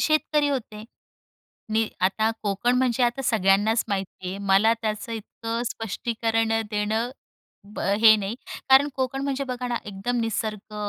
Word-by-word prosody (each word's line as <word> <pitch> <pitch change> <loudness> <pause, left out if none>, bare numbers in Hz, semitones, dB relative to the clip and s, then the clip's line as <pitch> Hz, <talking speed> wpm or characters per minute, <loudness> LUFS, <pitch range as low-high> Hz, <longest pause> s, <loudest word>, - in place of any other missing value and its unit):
शेतकरी 300 -1 +2
होते. 220 -6 -4 0.9
नी 220 0 +2
आता 215 +4 +2
कोकण 210 +4 +1
म्हणजे 250 -1 +1
आता 245 +3 +1
सगळ्यांनाच 215 0 +3
माहिती 190 -2 -4
आहे. 195 +2 -5
मला 200 +3 +4
त्याचं 215 +1 -3
इतकं 225 +1 -4
स्पष्टीकरण 225 +1 -1
अ, 225 - +2
देणं 215 +3 -1 0.6
ब - - -6
अ, 200 - +1
हे 220 -1 +9
नाही. 205 +1 -3 0.3
कारण 265 +2 +7
कोकण 265 0 -2
म्हणजे 275 0 -1
बघा 250 -1 -4
ना, 240 - -1
एकदम 210 +5 -2
निसर्ग, 215 -1 -3
225 Hz, 150 wpm, -25 LUFS, 210-245 Hz, 0.9 s, हे